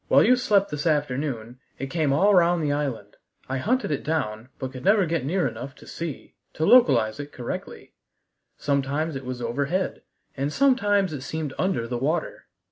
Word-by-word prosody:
"While - - +6
you 255 - +6
slept 205 -7 +2
this 150 +2 -2
afternoon 135 -5 -1 0.2
it 135 0 -5
came 155 -5 +1
all 195 +9 +4
round 175 -2 +4
the 145 - +1
island. 135 -8 -3 0.3
I 130 0 -2
hunted 250 - 0
it 145 - -2
down, 120 -7 -2
but 130 -1 -5
could 130 -2 -9
never 200 0 +4
get 165 -4 -1
near 175 +4 +1
enough 125 +4 -7
to - - -15
see 165 -4 -6 0.2
to 160 - -1
localize 125 - +5
it 145 0 -6
correctly. 125 -4 -7 0.6
Sometimes 140 +2 -1
it 135 -1 -6
was 125 -1 -5
overhead, 140 +10 -1 0.3
and 140 +2 -2
sometimes 205 - +2
it 140 - -5
seemed 150 0 -4
under 185 -11 0
the 120 0 -3
water. 155 +5 -2
145 Hz, 180 wpm, -25 LUFS, 130-175 Hz, 0.6 s, While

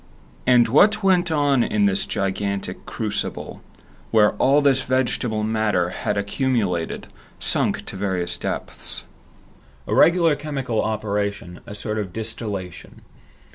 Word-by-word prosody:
And 125 -2 +6
what 210 - +4
went 180 -2 +3
on 145 -5 +2
in 105 -1 +1
this 100 -1 +1
gigantic 100 0 -3
crucible, - - -3 0.5
where 105 -2 +4
all 140 +6 +4
this 140 -2 +3
vegetable 120 -4 0
matter 110 -5 +1
had 105 - -2
accumulated, 100 -5 -1 0.3
sunk - - 0
to - - -7
various 95 -3 -1
depths? - - -3 0.8
A - - -3
regular 170 -3 +5
chemical 140 -6 -2
operation, 100 -4 -3
a 105 - -7
sort 105 +1 -3
of 95 -4 -5
distillation. 105 -5 -6
110 Hz, 120 wpm, -22 LUFS, 100-135 Hz, 0.8 s, And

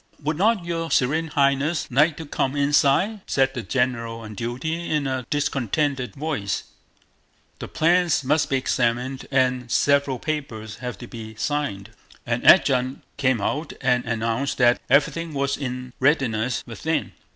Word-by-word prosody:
"Would 155 +2 0
not 205 -1 +2
your 165 -1 -3
Serene 155 +5 +1
Highness 140 +2 +1
like 150 +5 +3
to 160 - -6
come 140 -1 -1
inside?" 145 +8 +2
said 135 -1 +2
the 125 - -4
general 115 -2 -1
on 110 -1 -8
duty 130 - -4
in 150 -2 0
a 130 -2 -3
discontented 140 -1 -1
voice, 140 -9 -2 1.0
"the - - -6
plans 170 -1 +2
must 150 +3 +1
be 135 - +2
examined 125 +1 -1
and 130 -2 +1
several 140 0 +2
papers 120 -9 -5
have 125 -4 -6
to 120 - -9
be 110 -2 -9
signed." 110 -6 -3 0.3
An 120 0 -1
adjutant 130 -6 +4
came 130 -4 +2
out 150 +9 -2
and 125 -1 +2
announced 115 +3 -1
that 120 -1 +4
everything 150 +4 +2
was 140 0 0
in 125 -2 -5
readiness 130 -4 +1
within. 155 +7 -2
135 Hz, 145 wpm, -23 LUFS, 120-150 Hz, 1.0 s, adjutant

